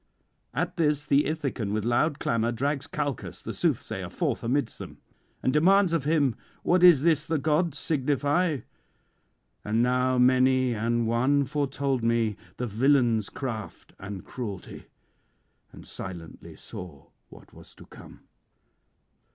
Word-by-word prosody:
At -, -, -2 dB
this 150 Hz, -3 st, +1 dB
the 145 Hz, 0 st, +3 dB
Ithacan 140 Hz, -9 st, -2 dB
with 110 Hz, 0 st, -1 dB
loud 140 Hz, +5 st, +1 dB
clamour 115 Hz, -3 st, 0 dB
drags 140 Hz, +4 st, -2 dB
Calchas 145 Hz, -5 st, -4 dB
the -, -, -5 dB
soothsayer -, -, -1 dB
forth -, -, -2 dB
amidst 125 Hz, 0 st, -1 dB
them, -, -, -9 dB, 0.5 s
and 130 Hz, -, +1 dB
demands 185 Hz, +4 st, +4 dB
of 160 Hz, -5 st, 0 dB
him 145 Hz, -5 st, +2 dB, 0.3 s
what 180 Hz, +1 st, +3 dB
is 170 Hz, -6 st, +8 dB
this 160 Hz, -3 st, +3 dB
the 160 Hz, -, +1 dB
gods 155 Hz, +1 st, +1 dB
signify. 145 Hz, +2 st, +1 dB, 1.0 s
And 110 Hz, +3 st, +1 dB
now 125 Hz, +1 st, +2 dB
many 130 Hz, 0 st, +4 dB
an 115 Hz, +1 st, 0 dB
one 125 Hz, +5 st, +2 dB
[125 140 Hz, -1 st, -1 dB
158]foretold -, -, -9 dB
me 115 Hz, -2 st, +1 dB, 0.2 s
the 125 Hz, -, -2 dB
villain's 120 Hz, -2 st, +2 dB
craft 110 Hz, -, -6 dB
and 95 Hz, -1 st, -7 dB
cruelty, 105 Hz, -7 st, -7 dB, 0.8 s
and -, -, -13 dB
silently 85 Hz, -3 st, -8 dB
saw 80 Hz, -7 st, -10 dB, 0.2 s
what -, -, -16 dB
was -, -, -15 dB
to -, -, -14 dB
come. -, -, -14 dB
130 Hz, 135 wpm, -27 LUFS, 115-150 Hz, 1.0 s, is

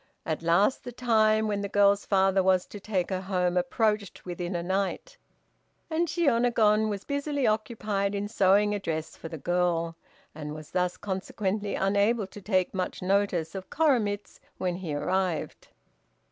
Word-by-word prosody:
At 160 Hz, -1 st, -2 dB
last 175 Hz, +9 st, +2 dB
the 245 Hz, -, -6 dB
time 220 Hz, -3 st, +2 dB
when 205 Hz, -1 st, -1 dB
the 200 Hz, -, -3 dB
girl's 200 Hz, 0 st, +3 dB
father 195 Hz, -1 st, +3 dB
was 185 Hz, -1 st, +3 dB
to 205 Hz, -, -10 dB
take 195 Hz, -3 st, -2 dB
her 185 Hz, -1 st, -1 dB
home 180 Hz, -2 st, 0 dB
approached 205 Hz, +3 st, 0 dB
within 175 Hz, 0 st, -4 dB
a 170 Hz, -, -2 dB
night, 195 Hz, -, -2 dB, 0.8 s
and 335 Hz, +2 st, +1 dB
Shiônagon 235 Hz, -8 st, +3 dB
was 200 Hz, -1 st, -4 dB
busily 285 Hz, -1 st, -1 dB
occupied 215 Hz, -2 st, 0 dB
in 200 Hz, +1 st, -2 dB
sewing 205 Hz, 0 st, +3 dB
a 205 Hz, -, -1 dB
dress 160 Hz, -4 st, -4 dB
for 165 Hz, -, -8 dB
the 160 Hz, -, -6 dB
girl, 170 Hz, 0 st, 0 dB, 0.4 s
and 150 Hz, 0 st, -6 dB
was 155 Hz, -1 st, -10 dB
thus 180 Hz, -1 st, 0 dB
consequently 200 Hz, +1 st, -3 dB
unable 205 Hz, +3 st, +2 dB
to 200 Hz, +2 st, -12 dB
take 185 Hz, -2 st, +1 dB
much 185 Hz, -1 st, -3 dB
notice 190 Hz, -4 st, +1 dB
of 190 Hz, -1 st, -7 dB
Koremitz 235 Hz, -10 st, 0 dB, 0.2 s
when 180 Hz, -1 st, -1 dB
he 180 Hz, -4 st, -5 dB
arrived. 185 Hz, +1 st, -2 dB
200 Hz, 160 wpm, -28 LUFS, 180-215 Hz, 0.8 s, girl's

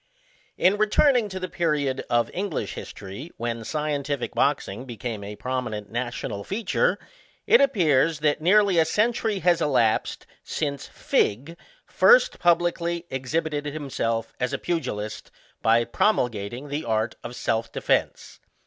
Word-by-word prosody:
In 190 Hz, +3 st, +3 dB
returning 225 Hz, +2 st, +3 dB
to 190 Hz, -1 st, -5 dB
the 185 Hz, -, -3 dB
period 150 Hz, -6 st, -1 dB
of 120 Hz, 0 st, +1 dB
English 190 Hz, -4 st, -3 dB
history, 100 Hz, -, -8 dB
when 115 Hz, 0 st, -3 dB
scientific 145 Hz, -1 st, -2 dB
boxing 130 Hz, -5 st, 0 dB
became 115 Hz, -3 st, -5 dB
a 105 Hz, +1 st, -7 dB
prominent 125 Hz, -5 st, -4 dB
national 120 Hz, -4 st, -4 dB
feature, 195 Hz, -, 0 dB, 0.5 s
it 460 Hz, -, +6 dB
appears, 165 Hz, -, +3 dB
that 150 Hz, 0 st, +1 dB
nearly 195 Hz, +1 st, +4 dB
a 160 Hz, -, +4 dB
century 220 Hz, +3 st, +1 dB
has 175 Hz, -1 st, +3 dB
elapsed 125 Hz, -7 st, +1 dB, 0.2 s
since 140 Hz, -3 st, -3 dB
FiGG 140 Hz, +11 st, -1 dB, 0.3 s
first -, -, +4 dB
publicly 170 Hz, 0 st, +1 dB
exhibited 145 Hz, +3 st, -2 dB
himself 130 Hz, -6 st, -3 dB
as 125 Hz, +2 st, -1 dB
a -, -, 0 dB
pugilist, 130 Hz, -12 st, -4 dB, 0.3 s
by 115 Hz, +1 st, +4 dB
promulgating 120 Hz, -, 0 dB
the 145 Hz, +3 st, -3 dB
art 110 Hz, 0 st, 0 dB
of 120 Hz, +1 st, -7 dB
self 115 Hz, -1 st, -1 dB
defence. -, -, -1 dB
145 Hz, 130 wpm, -25 LUFS, 120-175 Hz, 0.5 s, it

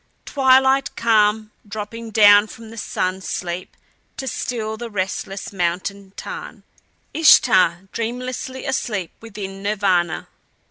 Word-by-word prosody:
Twilight 265 Hz, 0 st, +3 dB
calm 215 Hz, -1 st, +2 dB, 0.2 s
dropping 220 Hz, +2 st, -6 dB
down 205 Hz, -1 st, +6 dB
from 225 Hz, 0 st, -12 dB
the 230 Hz, -, -11 dB
sun 185 Hz, -2 st, -2 dB
sleep 180 Hz, -1 st, -5 dB, 0.4 s
to 265 Hz, -, -5 dB
still 220 Hz, -3 st, -3 dB
the 235 Hz, +1 st, -7 dB
restless 195 Hz, 0 st, -4 dB
mountain 190 Hz, +2 st, -3 dB
tarn. -, -, -8 dB, 0.5 s
Ishtar 185 Hz, -, +5 dB
dreamlessly 250 Hz, +3 st, -4 dB
asleep 210 Hz, -9 st, -2 dB
within 200 Hz, -3 st, -8 dB
Nirvana. 195 Hz, -5 st, 0 dB
210 Hz, 105 wpm, -21 LUFS, 195-230 Hz, 0.5 s, down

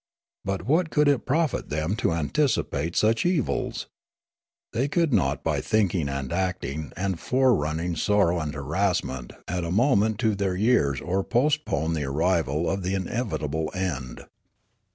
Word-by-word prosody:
But 95 Hz, -2 st, -2 dB
what 160 Hz, +6 st, +2 dB
could 150 Hz, -1 st, +3 dB
it 140 Hz, -3 st, +2 dB
profit 150 Hz, +1 st, 0 dB
them 80 Hz, +6 st, -1 dB
to 115 Hz, -, +1 dB
anticipate 85 Hz, -, 0 dB
such 110 Hz, +1 st, +3 dB
evils? 175 Hz, -7 st, 0 dB, 0.9 s
They 130 Hz, +5 st, +1 dB
could 165 Hz, -1 st, +1 dB
not 70 Hz, -9 st, +1 dB
by -, -, 0 dB
thinking 95 Hz, -8 st, +1 dB
and 70 Hz, 0 st, -3 dB
acting 85 Hz, -6 st, -2 dB
and 95 Hz, -2 st, -1 dB
forerunning 90 Hz, -, +1 dB
Sneekape 80 Hz, -, -2 dB
173 105 Hz, -, +4 dB
sorrow 90 Hz, -4 st, +3 dB
and 75 Hz, -2 st, -4 dB
harassment 70 Hz, -4 st, -1 dB
add 90 Hz, 0 st, -2 dB
a 85 Hz, -, -3 dB
moment 110 Hz, +1 st, +3 dB
to 110 Hz, -3 st, +2 dB
their 100 Hz, -2 st, -1 dB
3'ears 90 Hz, -, +2 dB
or 95 Hz, +2 st, +1 dB
postpone 120 Hz, -, +1 dB
the 75 Hz, -3 st, -1 dB
arrival 80 Hz, +1 st, +1 dB
of 95 Hz, +1 st, -1 dB
the 95 Hz, +2 st, -1 dB
inevitable 80 Hz, -, -2 dB
end. 70 Hz, -10 st, -4 dB
95 Hz, 155 wpm, -25 LUFS, 80-115 Hz, 0.9 s, 173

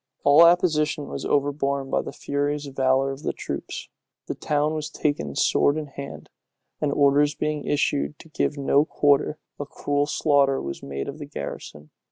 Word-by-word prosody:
All 145 Hz, +3 st, +7 dB
opposition 160 Hz, -4 st, +3 dB
was -, -, -5 dB
overborne 140 Hz, -1 st, 0 dB
by -, -, +2 dB
the -, -, -7 dB
furious 145 Hz, +1 st, -2 dB
valor 135 Hz, 0 st, +1 dB
of 135 Hz, +1 st, -8 dB
the -, -, -2 dB
troops. -, -, -6 dB, 0.4 s
The -, -, -3 dB
town 150 Hz, +1 st, 0 dB
was 155 Hz, -1 st, -3 dB
taken 145 Hz, -, -2 dB
sword 145 Hz, -, +3 dB
in 155 Hz, -, -3 dB
hand; 140 Hz, -1 st, -9 dB, 0.5 s
and 150 Hz, -2 st, +1 dB
orders 145 Hz, +1 st, +3 dB
being 150 Hz, -1 st, -2 dB
issued 75 Hz, -, 0 dB
to 160 Hz, -, -15 dB
give 150 Hz, -1 st, -1 dB
no 140 Hz, +1 st, +3 dB
quarter, 145 Hz, 0 st, +2 dB, 0.2 s
a 145 Hz, -, -3 dB
cruel 145 Hz, 0 st, -1 dB
slaughter 140 Hz, -3 st, +2 dB
was 70 Hz, 0 st, -6 dB
made 70 Hz, 0 st, -5 dB
of -, -, -7 dB
the -, -, -7 dB
garrison. 75 Hz, +1 st, -8 dB
145 Hz, 170 wpm, -24 LUFS, 135-150 Hz, 0.5 s, All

